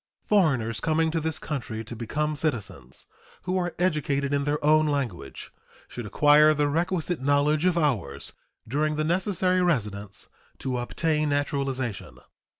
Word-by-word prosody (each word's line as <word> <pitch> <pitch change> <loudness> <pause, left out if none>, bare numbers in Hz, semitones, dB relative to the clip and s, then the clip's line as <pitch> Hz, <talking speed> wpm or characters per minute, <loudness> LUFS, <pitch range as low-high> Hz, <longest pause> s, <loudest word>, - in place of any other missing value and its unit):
Foreigners 130 - +2
coming 160 0 +1
to 165 0 -1
this 160 0 -2
country 115 -7 -5
to 115 +2 -8
become 150 +7 -2
citizens, 105 - -4 0.4
who 185 +1 -2
are 175 -2 -1
educated 145 -5 0
in 140 0 +1
their 145 0 +1
own 155 +1 +5
language, 125 - -3 0.4
should 120 -3 -7
acquire 150 +7 +5
the 145 0 +2
requisite 170 +1 -1
knowledge 145 +3 +2
of 175 -2 +2
ours 110 - -1 0.3
during 150 +5 0
the 155 - 0
necessary 185 +2 +1
residence 105 - -1 0.3
to 130 -2 -2
obtain 155 +4 0
naturalization. 140 - -2
150 Hz, 140 wpm, -26 LUFS, 125-160 Hz, 0.4 s, own